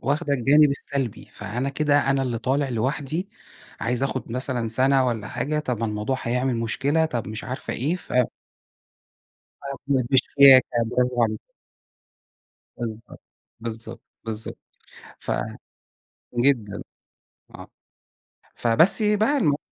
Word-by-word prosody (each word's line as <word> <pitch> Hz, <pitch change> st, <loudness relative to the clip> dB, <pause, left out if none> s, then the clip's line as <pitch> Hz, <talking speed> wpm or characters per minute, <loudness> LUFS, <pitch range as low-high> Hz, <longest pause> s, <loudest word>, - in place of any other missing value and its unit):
واخدة 145 Hz, +1 st, -1 dB
الجانب 140 Hz, +4 st, +5 dB
السَّلبي، 140 Hz, -4 st, -4 dB
فأنا 115 Hz, +7 st, -4 dB
كده 145 Hz, 0 st, +2 dB
أنا 135 Hz, 0 st, +2 dB
اللي 120 Hz, -3 st, -2 dB
طالع 135 Hz, +4 st, 0 dB
لوحدي، 140 Hz, -, -2 dB, 0.5 s
عايز 120 Hz, +3 st, -1 dB
آخُد 130 Hz, -3 st, -3 dB
مثلًا 125 Hz, -2 st, -1 dB
سَنَة 130 Hz, +3 st, +3 dB
والّا 110 Hz, -4 st, -2 dB
حاجة، 150 Hz, +2 st, -2 dB
طَب 125 Hz, -6 st, -3 dB
الموضوع 105 Hz, +4 st, -2 dB
هيعمل 125 Hz, +1 st, 0 dB
مشكلة، 135 Hz, +7 st, 0 dB
طَب 120 Hz, -9 st, -3 dB
مش 110 Hz, +1 st, -6 dB
عارفة 130 Hz, +1 st, -5 dB
إيه، 150 Hz, +8 st, -1 dB
ف 180 Hz, -, -12 dB, 1.6 s
أرفض 140 Hz, 0 st, -2 dB, 0.2 s
بشياكة 135 Hz, -1 st, +6 dB, 0.2 s
براڤو 125 Hz, 0 st, +1 dB
عليكِ. 110 Hz, -1 st, -1 dB, 1.4 s
بالضبط، 115 Hz, -1 st, -7 dB, 0.4 s
بالضبط، 115 Hz, 0 st, -6 dB, 0.2 s
بالضبط، 110 Hz, -1 st, -5 dB, 0.6 s
ف -, -, -5 dB, 1.1 s
جدًا، 120 Hz, -6 st, +1 dB, 0.7 s
آه، -, -, -10 dB, 0.9 s
فبس 140 Hz, -, +4 dB
بقى 215 Hz, +6 st, +2 dB
الم 150 Hz, -, +2 dB
130 Hz, 115 wpm, -24 LUFS, 115-140 Hz, 1.6 s, بشياكة